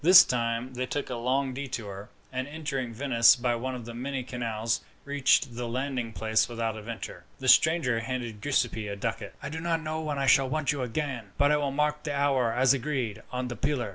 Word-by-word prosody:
This 180 +3 +10
time 120 +1 -1
they 130 +1 -3
took 145 -1 -3
a - - -2
long 130 +3 0
detour, 115 -7 -6 0.2
and, 130 +1 -2
entering 145 -5 -3
Venice 115 -1 +5
by 120 -1 0
one 130 +2 -3
of 120 -2 -7
the 120 - -7
many 130 +2 -3
canals, 115 -2 -2 0.2
reached 140 -3 +2
the 120 0 -3
landing 125 -1 -2
place 110 +1 +1
without 115 -2 -2
adventure. 110 -5 -7
The 130 - -5
stranger 135 -5 +5
handed 115 -2 -4
Giuseppi 120 -6 0
a 100 - -4
ducat. 115 +3 -4
"I - - -3
do 160 +2 -5
not 165 0 0
know 155 +1 -3
when 150 -2 -3
I 135 - 0
shall 135 -2 +5
want 150 0 0
you 145 -3 -3
again; 125 -5 -3
but 145 +1 +4
I 150 - +4
will 145 -1 0
mark 150 +2 0
the 145 -2 -3
hour, 135 -4 +2
as 125 +3 +4
agreed, 130 -6 -2
on 125 0 -2
the 120 - -5
pillar. 120 -1 -1
130 Hz, 210 wpm, -28 LUFS, 115-140 Hz, 0.2 s, This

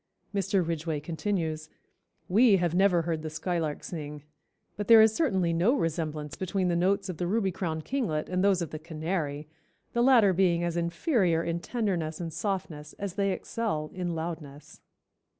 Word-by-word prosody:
Mr. 195 -2 +1
Ridgway 160 -2 -2
continues: 160 -1 -3 0.6
"We 210 +2 +5
have 175 -2 0
never 180 -2 +3
heard 165 -1 -2
the 155 - -4
skylark 160 -1 -2
sing, 150 -3 -6 0.5
but 205 - -4
there 230 -1 +9
is 220 0 +6
certainly 190 - +1
no 185 +11 +3
resemblance 155 - -2
between 185 0 -1
the 175 - +1
notes 195 +3 +1
of 180 -4 -5
the 175 - -2
Ruby 200 0 +1
crowned 160 -3 -3
Kinglet 200 - -1
and 185 +1 0
those 195 -3 +3
of 165 - -7
the 155 - -5
canary, 155 -2 -3 0.5
the 235 - +2
latter 240 -6 +6
being 175 -2 +2
as 170 -1 -1
inferior 170 - +1
in 170 0 -2
tenderness 175 -8 -2
and 165 -2 -5
softness 165 -7 -4
as 200 -3 -5
they 195 0 +1
excel 185 -6 -3
in 180 -2 -3
loudness." 160 -3 -7
175 Hz, 170 wpm, -28 LUFS, 160-195 Hz, 0.6 s, there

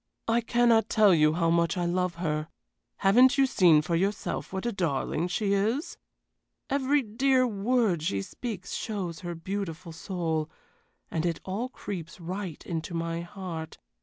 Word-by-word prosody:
"I 230 +1 +3
cannot 235 -1 +3
tell 210 -4 +5
you 155 -2 +4
how 165 0 +1
much 170 +2 +2
I 175 - 0
love 180 0 0
her. 155 -3 -2 0.5
Haven't 250 +8 +5
you 275 - +5
seen 170 -11 +5
for 170 +2 -1
yourself 195 +4 -1
what 190 +2 -4
a 240 - +1
darling 170 - -1
she 200 +2 0
is? 220 - 0 0.8
Every 280 +1 +2
dear 255 +4 +2
word 215 -4 +1
she 100 -11 -1
speaks 210 - -6
shows 190 -7 -3
her 175 -1 -5
beautiful 175 -1 -5
soul, 160 -2 -2 0.6
and 160 - -1
it 170 -2 -1
all 210 +7 -3
creeps 185 -8 -7
right 180 -1 -5
into 165 0 -4
my 165 0 -2
heart. 170 -3 -7
185 Hz, 155 wpm, -28 LUFS, 165-220 Hz, 0.8 s, tell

